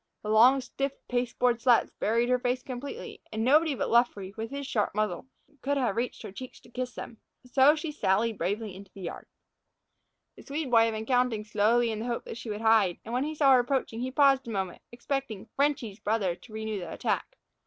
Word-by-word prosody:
The 210 - -4
long, 245 +5 +6
stiff 275 +2 -3
pasteboard 245 -1 0
slats 240 -1 +4
buried 230 +3 +2
her 250 0 +3
face 250 0 -1
completely, 275 - -7
and 220 0 -2
nobody 300 +2 +4
but - - -2
Luffree, 210 -5 +2
with 225 0 -5
his 280 0 -5
sharp 210 -7 -1
muzzle, 215 +1 -1 0.3
could 285 +1 0
have 245 -7 0
reached 240 +2 -3
her - - -7
cheeks 255 +6 -9
to - - -19
kiss 250 0 -4
them. 230 - -8 0.3
So 265 +4 +5
she 315 0 -4
sallied 220 -4 0
bravely 205 +4 -2
into 195 0 -12
the 195 - -11
yard. 170 - -7 1.1
The - - -13
Swede 285 -2 -4
boy 225 -1 +6
had 225 - -1
been 220 0 -4
counting 245 -3 +1
slowly 225 +3 +2
in 215 - -4
the 230 - -4
hope 235 -1 -3
that - - -7
she 230 - -7
would 210 0 -4
hide, 220 -5 +4
and 230 - -6
when 255 +3 +1
he 310 +1 -4
saw 280 -3 +5
her 255 - +6
approaching 245 -2 -1
he 255 - -2
paused 270 -1 +3
a - - -5
moment, 190 -5 -3
expecting 240 -3 -4
"Frenchy's" 275 -7 0
brother 205 -4 0
to 195 +6 -16
renew 220 -1 -4
the 175 -3 -7
attack. - - -2
235 Hz, 215 wpm, -28 LUFS, 215-265 Hz, 1.1 s, long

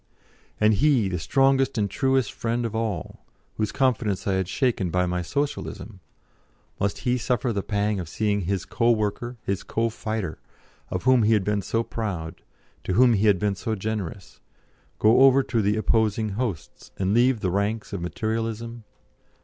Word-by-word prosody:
And 110 0 +4
he, 125 -3 +3
the 90 -2 -2
strongest 135 - +2
and 105 -2 +1
truest 130 +2 0
friend 120 +1 -2
of 115 - -3
all, 110 -7 -3 0.3
whose 105 -2 -1
confidence 115 -7 0
I 100 - +1
had 95 -1 0
shaken 105 -2 0
by 90 +2 +1
my 90 0 -1
Socialism 115 - -4 0.8
must 100 0 0
he 125 0 +1
suffer 125 +1 0
the 100 - -1
pang 105 0 -1
of 85 -3 -6
seeing 105 +2 0
his 95 0 -2
co 120 0 +1
worker, 115 +2 -1
his 100 0 -2
co 115 +1 -1
fighter, 110 -6 -4 0.5
of 90 - -3
whom 130 0 +5
he 110 +1 +4
had 105 -3 +2
been 105 +1 0
so 115 +4 -1
proud, 90 -8 -5 0.4
to 95 - -2
whom 120 +3 +5
he 105 0 +2
had 100 -2 +5
been 105 +2 0
so 110 +3 -3
generous, 100 -3 -5 0.6
go 110 +4 +5
over 135 0 +6
to 115 -4 0
the 105 +1 +1
opposing 110 0 +1
hosts, 100 - -5
and 95 +1 0
leave 120 0 +3
the 90 - 0
ranks 105 +3 -1
of 100 - -3
Materialism? 115 +4 -3
110 Hz, 175 wpm, -25 LUFS, 100-120 Hz, 0.8 s, over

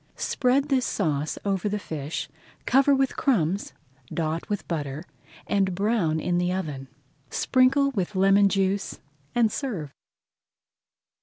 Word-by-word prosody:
Spread 270 +3 +1
this 265 -2 +2
sauce 155 -6 -1
over 195 0 0
the 210 - -1
fish, 155 -5 -5 0.4
cover 275 +2 +4
with 270 -1 +1
crumbs, 200 - +1 0.4
dot 160 0 -2
with 205 -2 -3
butter, 150 -2 -3 0.4
and 195 -2 +1
brown 195 -6 +1
in 175 +2 0
the 180 0 0
oven. 150 -8 -4 0.4
Sprinkle 270 +2 +3
with 200 -4 -3
lemon 195 +1 +5
juice 195 0 0 0.4
and 230 -3 +3
serve. 195 - -4
195 Hz, 125 wpm, -25 LUFS, 165-240 Hz, 0.4 s, lemon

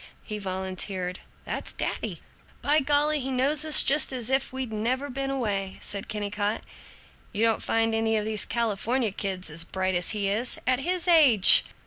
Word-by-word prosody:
He 210 -1 -6
volunteered, 185 -1 -5 0.3
"That's - - -5
daddy." - - -5 0.4
"By 295 +2 +3
golly, 295 +1 +1
he 265 0 -4
knows 275 +4 +2
us 310 -1 +7
just 300 +1 +3
as 255 -2 -2
if 265 0 0
we'd 260 -3 -5
never 255 +6 -2
been 270 +1 -4
away!" 205 -8 -3
said 200 -1 -5
Kennicott. 210 0 -3 0.7
"You 215 +1 -2
don't 225 -1 +1
find 225 0 0
any 225 0 +1
of 210 - -2
these 215 -1 0
California 230 +1 -1
kids 190 -4 -4
as 165 +2 -1
bright 185 +1 -3
as 175 -1 +1
he 205 -2 0
is, 220 +5 0
at 255 0 +1
his 360 +5 -2
age!" 285 - +7
225 Hz, 170 wpm, -25 LUFS, 200-265 Hz, 0.7 s, us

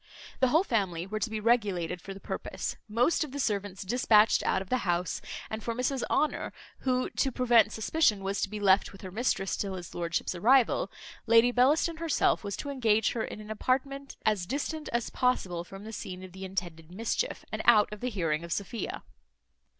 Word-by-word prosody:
The 260 - +4
whole 315 +8 +4
family 190 - -1
were 215 +3 -4
to 225 - -1
be 220 0 -3
regulated 205 -7 +1
for 195 - -8
the - - -10
purpose, - - -4
most 245 +10 +2
of 300 - -7
the 285 - -5
servants 200 -6 -2
despatched 220 0 +4
out - - +2
of 190 0 -8
the 255 - +2
house; 175 -3 -1 0.3
and 220 0 -5
for 230 +1 -2
Mrs 255 +1 -1
Honour, 305 - 0 0.3
who, 255 -1 0
to 270 - 0
prevent 235 -3 +4
suspicion, 220 -2 +1
was 195 +1 -2
to - - 0
be 210 +1 -5
left 195 -1 +4
with 195 - -13
her 185 - -7
mistress 200 -3 0
till 195 -2 -3
his 175 -3 -8
lordship's 170 0 -2
arrival, 250 - +3 0.4
Lady 230 +2 +6
Bellaston 295 +7 +3
herself 330 -8 +1
was 200 -1 -4
to 285 - -4
engage 225 -5 +2
her 225 - -2
in - - -6
an 210 0 -8
apartment 275 +4 -2
as 205 -5 +1
distant 300 - -3
as 240 -1 -1
possible 185 -9 0
from 195 +3 -11
the 220 +1 -8
scene 185 -3 -6
of 185 - -10
the 190 +1 -8
intended 175 -4 -5
mischief, 230 - -2
and - - -2
out 210 -3 +5
of 210 - -8
the 250 - -2
hearing 165 -7 -1
of 170 - -8
Sophia. 200 +6 -3
215 Hz, 200 wpm, -29 LUFS, 190-250 Hz, 0.4 s, Lady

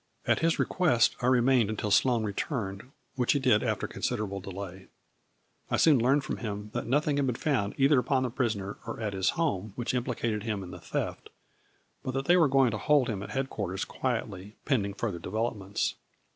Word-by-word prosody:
At - - +2
his 165 0 +2
request, 145 - +2
I 125 - +1
remained 125 -3 +4
until 105 -1 -2
Sloane 120 +2 +3
re 105 -2 -2
turned, 105 -3 -4 0.2
which 125 -3 +2
he 145 - +1
did 125 -6 +4
after - - -1
considerable 105 -5 -3
delay. 95 0 -8 0.8
I - - +1
soon 150 -5 +5
learned 135 +4 +3
from - - -3
him 105 -2 -5
that - - -3
nothing 145 +3 +1
had 140 -1 +1
been 125 - 0
found 120 -8 0
either 135 0 +5
upon 130 0 +1
the 125 - -2
prisoner 110 -6 -2
or - - -5
at 105 -3 -2
his 95 0 +1
home, 110 - -1
which 120 +1 -2
implicated 120 -3 -1
him 105 -3 -3
in 90 - -9
the - - -9
theft, - - -4 0.7
but 130 - -4
that 135 0 -1
they 175 - +5
were 170 -4 +5
going 135 -3 +4
to 105 - -3
hold 145 -5 +3
him 100 -3 -3
at 100 - -7
head 135 +4 -2
quarters 95 -2 -3
quietly, 105 -5 -4
pending 100 -8 0
further 100 -7 -3
developments. 105 +1 -2
115 Hz, 200 wpm, -29 LUFS, 100-135 Hz, 0.8 s, soon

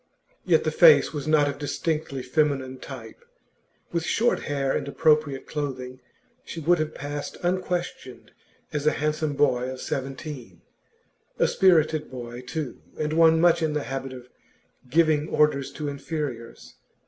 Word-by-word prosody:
Yet - - +4
the - - 0
face 475 - +6
was 145 -1 -4
not 155 -2 +4
of 140 - -4
distinctly 150 -2 -2
feminine 130 -2 0
type; 480 - -10 0.7
with 170 -1 -1
short 230 +8 +1
hair 135 -2 0
and - - -2
appropriate 150 -2 +2
clothing, 130 -4 -5 0.4
she 165 - -7
would 170 +2 +3
have 155 0 -2
passed 145 +1 -5
unquestioned 175 -8 -3 0.4
as 150 0 -1
a - - +4
handsome 150 0 -1
boy 130 -3 +1
of 130 0 -6
seventeen, 135 - -6 0.7
a - - +3
spirited 160 -4 +3
boy 120 -1 -7
too, 130 +2 -5 0.2
and 155 0 -1
one 160 0 +5
much 170 0 +4
in 155 -2 0
the 150 -1 -1
habit 135 0 -5
of 125 -1 -10 0.6
giving 155 +1 +3
orders 145 -3 +2
to 150 - -4
inferiors. 140 -4 -5
150 Hz, 145 wpm, -25 LUFS, 135-160 Hz, 0.7 s, face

